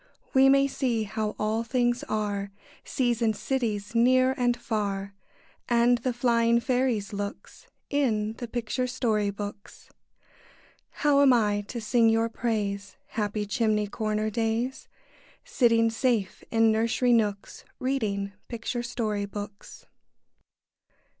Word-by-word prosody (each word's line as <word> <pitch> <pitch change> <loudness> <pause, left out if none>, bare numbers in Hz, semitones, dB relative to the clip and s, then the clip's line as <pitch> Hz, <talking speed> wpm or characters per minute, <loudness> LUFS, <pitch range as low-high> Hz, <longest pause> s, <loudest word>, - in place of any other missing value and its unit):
We 270 0 +6
may 275 0 +5
see 250 -5 -1
how 215 +1 -3
all 215 +2 0
things 240 0 0
are, 205 -2 -2 0.3
Seas 240 -3 -1
and 220 -2 +2
cities, 220 -6 -2
near 255 +2 +4
and 245 -1 +1
far, 200 -4 -3 0.6
And 240 0 +4
the 255 +2 -1
flying 235 -1 +2
fairies' 240 -4 0
looks, 200 0 -7 0.2
In 220 -7 +1
the 240 - -4
picture 240 +2 -2
story 225 -5 0
books. 205 0 -8 1.0
How 290 -2 +2
am 275 -2 +6
I 210 -3 +2
to 240 - -5
sing 230 +1 +3
your 225 +1 +2
praise, 205 -4 -3
Happy 210 -1 -2
chimney 210 0 +1
corner 215 +1 -2
days, 230 +4 -2 0.6
Sitting 230 - +3
safe 225 -5 -1
in 225 -1 +4
nursery 230 +3 +2
nooks, 205 -3 -1
Reading 210 -7 -2
picture 240 +1 -4
story 220 -4 -2
books? 205 0 -9
225 Hz, 120 wpm, -27 LUFS, 210-245 Hz, 1.0 s, We